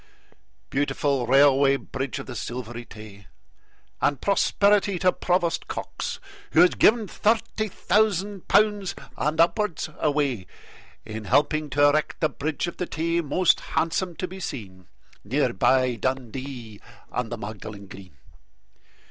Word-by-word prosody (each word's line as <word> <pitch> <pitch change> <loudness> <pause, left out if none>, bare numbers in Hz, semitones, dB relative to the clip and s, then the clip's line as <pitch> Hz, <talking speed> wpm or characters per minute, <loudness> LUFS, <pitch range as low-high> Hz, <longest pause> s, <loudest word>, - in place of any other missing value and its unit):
Beautiful 140 -2 0
Railway 140 +1 +5
Bridge 135 -1 -4
of - - -6
the 130 - -8
Silvery 120 0 -6
Tay! 105 -4 -13 0.7
And 145 -3 +1
prosperity 200 +1 +2
to 185 +1 +3
Provost 175 -2 0
Cox, - - -5 0.3
who - - +6
has 180 - +6
given 220 -1 +4
Thirty 220 +2 0
thousand 205 -1 0
pounds 205 -2 +2 0.2
and 150 +2 -1
upwards 175 -2 +1
away 140 - 0 0.6
In 110 0 -6
helping 150 +6 +2
to 145 +2 +3
erect 150 +1 0
the 155 - +2
Bridge 145 +2 -3
of 175 - -6
the 180 - -3
Tay, 165 +1 -1
Most 170 +4 +2 0.2
handsome 170 +2 0
to 185 - -4
be 190 +2 -9
seen, 95 - -7 0.4
Near 125 +3 0
by 130 -2 +2
Dundee 130 -3 -4 0.3
and 125 -2 -3
the - - -3
Magdalen 105 -1 -8
Green. 95 -5 -13
145 Hz, 130 wpm, -25 LUFS, 120-180 Hz, 0.7 s, who